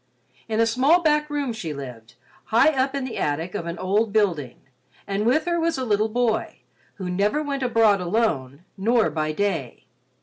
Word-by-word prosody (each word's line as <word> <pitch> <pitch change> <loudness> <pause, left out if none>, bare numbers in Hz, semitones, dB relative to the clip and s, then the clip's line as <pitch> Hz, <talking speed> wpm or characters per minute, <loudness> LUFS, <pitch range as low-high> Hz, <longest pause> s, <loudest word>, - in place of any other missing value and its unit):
In 220 0 -1
a 230 - +5
small 270 +10 +3
back 300 -1 +2
room 285 -4 -2
she 165 -9 -5
lived, 120 -4 -9 0.3
high 235 +7 +4
up 270 -1 0
in 275 - -2
the 260 - -5
attic 160 +5 -2
of 170 - -4
an 170 0 -4
old 205 +4 0
building, 170 - 0 0.5
and 200 +2 -1
with 275 +6 +2
her 345 -1 0
was 330 -2 0
a 260 - -2
little 215 -1 +1
boy 230 -1 -1 0.3
who 190 -3 -6
never 205 +11 0
went 280 -2 -3
abroad 225 -5 +3
alone, 170 - -1
nor 225 +3 +2
by 155 -1 -1
day. 200 +5 -2
220 Hz, 180 wpm, -23 LUFS, 180-260 Hz, 0.5 s, a